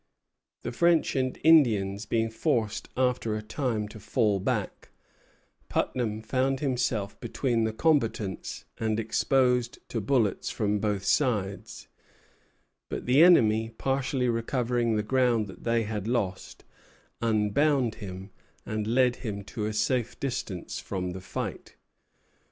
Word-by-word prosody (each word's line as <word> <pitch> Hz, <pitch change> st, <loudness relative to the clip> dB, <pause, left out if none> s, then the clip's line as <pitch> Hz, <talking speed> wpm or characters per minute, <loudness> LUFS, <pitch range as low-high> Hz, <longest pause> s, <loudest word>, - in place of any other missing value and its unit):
The -, -, -3 dB
French 170 Hz, +5 st, +2 dB
and 130 Hz, -1 st, 0 dB
Indians 110 Hz, -10 st, +4 dB
being 115 Hz, -1 st, 0 dB
forced 110 Hz, -1 st, -1 dB
after 125 Hz, -4 st, +1 dB
a 105 Hz, -, -4 dB
time 110 Hz, -1 st, -2 dB
to 110 Hz, -, -11 dB
fall 105 Hz, 0 st, +1 dB
back, -, -, -3 dB, 0.8 s
Putnam 110 Hz, -3 st, -1 dB
found 130 Hz, +3 st, 0 dB
himself 120 Hz, -7 st, -1 dB
between 120 Hz, -1 st, 0 dB
the 110 Hz, -, 0 dB
combatants 110 Hz, -7 st, 0 dB
and 110 Hz, -1 st, 0 dB
exposed 125 Hz, +2 st, +1 dB
to 115 Hz, -, -2 dB
bullets 110 Hz, -2 st, +1 dB
from 105 Hz, -1 st, 0 dB
both 105 Hz, -2 st, -1 dB
sides; 105 Hz, -7 st, -1 dB, 1.0 s
but -, -, -4 dB
the 130 Hz, +5 st, +5 dB
enemy, 115 Hz, -11 st, +5 dB
partially 135 Hz, -1 st, 0 dB
recovering 120 Hz, 0 st, 0 dB
the 105 Hz, -, 0 dB
ground 120 Hz, -3 st, +2 dB
they 115 Hz, +4 st, -1 dB
had 105 Hz, -1 st, -4 dB
lost, 100 Hz, -6 st, -2 dB, 0.6 s
unbound 115 Hz, +4 st, +2 dB
him, 95 Hz, 0 st, -7 dB, 0.3 s
and 110 Hz, -1 st, -3 dB
led 125 Hz, +1 st, +3 dB
him 100 Hz, -4 st, -5 dB
to 105 Hz, +2 st, -5 dB
a -, -, -2 dB
safe 120 Hz, +2 st, 0 dB
distance 120 Hz, -9 st, -4 dB
from 90 Hz, -2 st, -4 dB
the 95 Hz, +1 st, -7 dB
fight. 95 Hz, -, -6 dB
115 Hz, 125 wpm, -28 LUFS, 105-125 Hz, 1.0 s, the